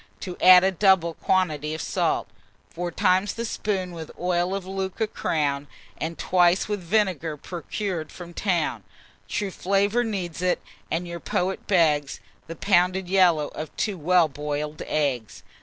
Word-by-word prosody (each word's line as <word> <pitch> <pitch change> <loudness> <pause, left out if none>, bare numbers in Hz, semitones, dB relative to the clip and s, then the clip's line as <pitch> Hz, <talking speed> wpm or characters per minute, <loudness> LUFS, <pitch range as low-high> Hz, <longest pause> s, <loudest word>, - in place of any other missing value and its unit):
To 180 -2 -5
add 185 0 +9
a 190 - +3
double 190 -3 +3
quantity 155 -5 0
of 160 - -5
salt: - - 0 0.4
Four 175 +1 -4
times 185 +4 +2
the 230 - -3
spoon 195 -5 -2
with 165 -2 -8
oil 180 +1 0
of 195 -2 -4
Lucca 190 +3 -2
crown, 145 -8 -1 0.3
And 165 +1 -4
twice 180 0 +3
with 210 -1 -2
vinegar 175 -5 0
procured 175 +1 -4
from 175 -1 -10
'town; 175 -4 -1 0.5
True 205 -2 -2
flavour 200 +6 +1
needs 185 -7 -4
it, 180 -1 +1 0.3
and 170 +2 -2
your 170 0 -6
poet 185 +3 -2
begs, 150 -7 +2 0.3
The 165 - -6
pounded 180 0 +2
yellow 175 -6 +4
of 155 -1 -8
two 210 - -1
well 175 +1 +4
boil'd 150 +1 -4
eggs. 125 -9 -1
180 Hz, 150 wpm, -25 LUFS, 160-190 Hz, 0.5 s, add